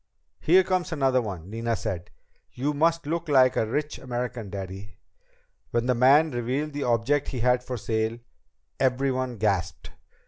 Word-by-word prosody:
"Here 185 +4 +5
comes 185 -1 -1
another 135 -4 +2
one," 95 -7 -6
Nina 115 +2 -2
said. 90 -4 -4 0.4
"You 140 +4 -1
must 165 +2 +1
look 165 +2 -3
like 130 -3 +5
a 110 - +1
rich 150 +6 -2
American, 120 -4 -4
Daddy." 95 0 -7 0.7
When 120 0 0
the 125 - +3
man 140 +6 +5
revealed 130 +5 -2
the 145 - -4
object 125 +5 +1
he 125 - -4
had 125 +1 +2
for 125 -1 -4
sale, 110 +2 -1 0.6
everyone 130 -1 0
gasped. 95 -5 -1
125 Hz, 150 wpm, -26 LUFS, 110-145 Hz, 0.7 s, Here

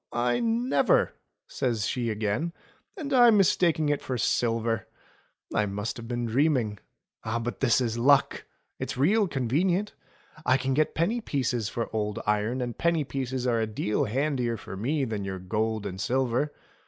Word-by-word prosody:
I 120 0 +1
never!" 245 - +2 0.3
says 115 -6 -1
she 120 +1 -1
again. 110 +10 -1 0.4
And 285 -3 -4
I 245 -2 +7
mistaking 175 -7 +3
it 145 - 0
for 130 - -3
silver! 115 -1 0 0.7
I 105 - +2
must 105 +3 -3
have 115 -1 -8
been 120 0 -2
dreaming. 120 -4 +1 0.4
But 115 +2 -3
this 130 -3 +3
is 120 -2 -1
luck! 140 +3 +3 0.3
It's - - -4
real 200 - +3
convenient. 170 - 0 0.5
I 130 +1 +4
can 135 0 -1
get 155 +3 +1
penny 215 +9 +1
pieces 125 - -1
for 115 0 -3
old 105 -1 -1
iron, 105 +4 0
and 120 -2 -3
penny 170 -2 +1
pieces 130 -2 -3
are 120 -2 +2
a 110 - 0
deal 105 +5 -1
handier 125 -1 -1
for 95 - -8
me 135 +8 0
than 110 -4 -3
your 95 -1 -4
gold 110 +3 -2
and 95 -1 -5
silver. 130 +4 0
125 Hz, 160 wpm, -27 LUFS, 110-150 Hz, 0.7 s, I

